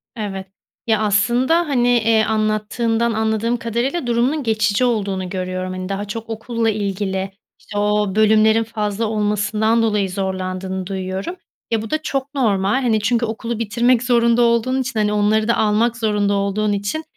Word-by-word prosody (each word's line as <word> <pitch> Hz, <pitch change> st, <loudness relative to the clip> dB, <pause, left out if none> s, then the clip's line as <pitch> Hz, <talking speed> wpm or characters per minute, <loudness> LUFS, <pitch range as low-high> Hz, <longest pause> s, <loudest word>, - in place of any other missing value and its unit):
Evet, 195 Hz, -4 st, -5 dB, 0.4 s
ya, 220 Hz, -1 st, +2 dB
aslında, 240 Hz, -, +2 dB
hani, 245 Hz, -4 st, +1 dB
eee, 225 Hz, -1 st, +3 dB
anlattığından 220 Hz, +2 st, 0 dB
anladığım 220 Hz, +2 st, 0 dB
kadarıyla 240 Hz, +6 st, -2 dB
durumunun 250 Hz, +5 st, +1 dB
geçici 215 Hz, +1 st, +1 dB
olduğunu 200 Hz, -6 st, -1 dB
görüyorum, 185 Hz, 0 st, -4 dB
hani, 185 Hz, 0 st, -5 dB
daha 200 Hz, +1 st, -3 dB
çok 225 Hz, +2 st, -7 dB
okulla 225 Hz, 0 st, -1 dB
ilgili, 195 Hz, -2 st, -2 dB, 0.3 s
işte, 205 Hz, -, -8 dB
o 205 Hz, -1 st, +1 dB
bölümlerin 220 Hz, +1 st, +4 dB
fazla 215 Hz, -1 st, -2 dB
olmasından 210 Hz, +1 st, +1 dB
dolayı 210 Hz, -3 st, +1 dB
zorlandığını 190 Hz, -1 st, -3 dB
duyuyorum. 190 Hz, -, -4 dB, 0.4 s
Ya, 225 Hz, -2 st, +1 dB
bu 220 Hz, -, -7 dB
da 310 Hz, -, 0 dB
çok 275 Hz, -1 st, -3 dB
normal, 210 Hz, -1 st, +1 dB
hani, 225 Hz, -4 st, +2 dB
çünkü 235 Hz, +2 st, +1 dB
okulu 230 Hz, +1 st, -4 dB
bitirmek 235 Hz, +2 st, +2 dB
zorunda 235 Hz, -1 st, +3 dB
olduğun 240 Hz, +3 st, +2 dB
için, 250 Hz, -4 st, -3 dB
hani, 210 Hz, 0 st, +1 dB
onları 210 Hz, +1 st, +2 dB
da 235 Hz, -, +2 dB
almak 220 Hz, +3 st, +2 dB
zorunda 210 Hz, -3 st, +1 dB
olduğun 200 Hz, +1 st, 0 dB
için, 205 Hz, +11 st, -3 dB
215 Hz, 155 wpm, -19 LUFS, 205-235 Hz, 0.4 s, bölümlerin